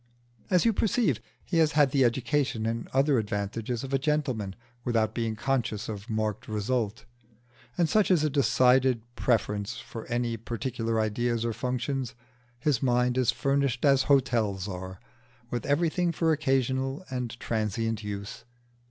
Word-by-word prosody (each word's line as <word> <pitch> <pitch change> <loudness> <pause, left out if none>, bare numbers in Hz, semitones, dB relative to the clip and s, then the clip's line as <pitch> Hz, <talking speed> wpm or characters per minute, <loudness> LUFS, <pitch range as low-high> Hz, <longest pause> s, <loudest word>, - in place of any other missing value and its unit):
As 180 +2 +3
you 230 - +4
perceive, 200 - +1 0.3
he 170 - +1
has 155 -2 +3
had 145 -3 +4
the 135 -1 +3
education 120 -1 +1
and 115 +1 -2
other 135 -1 +2
advantages 110 +3 -3
of 135 0 -6
a 135 - +3
gentleman 130 -9 -1 0.3
without 110 -3 +1
being 115 -2 -1
conscious 115 -3 -1
of 105 +1 -6
marked 110 -1 -2
result, 110 +1 -2 0.8
such 205 +6 +2
as 175 -5 +4
a 155 - +2
decided 130 -3 +3
preference 105 -2 0
for 115 - -8
any 120 -1 -1
particular 115 0 -2
ideas 115 +2 0
or 115 - -1
functions: 125 +1 -2 0.4
his 125 0 +1
mind 125 -1 +2
is 130 -3 +2
furnished 140 -1 +1
as 135 -2 +5
hotels 115 -8 +2
are, 95 -1 -6 0.5
with 120 -2 -3
everything 170 +4 +2
for 165 0 +1
occasional 135 0 0
and 125 -2 -4
transient 115 0 -1
use. 100 0 -6
120 Hz, 145 wpm, -28 LUFS, 110-135 Hz, 0.8 s, as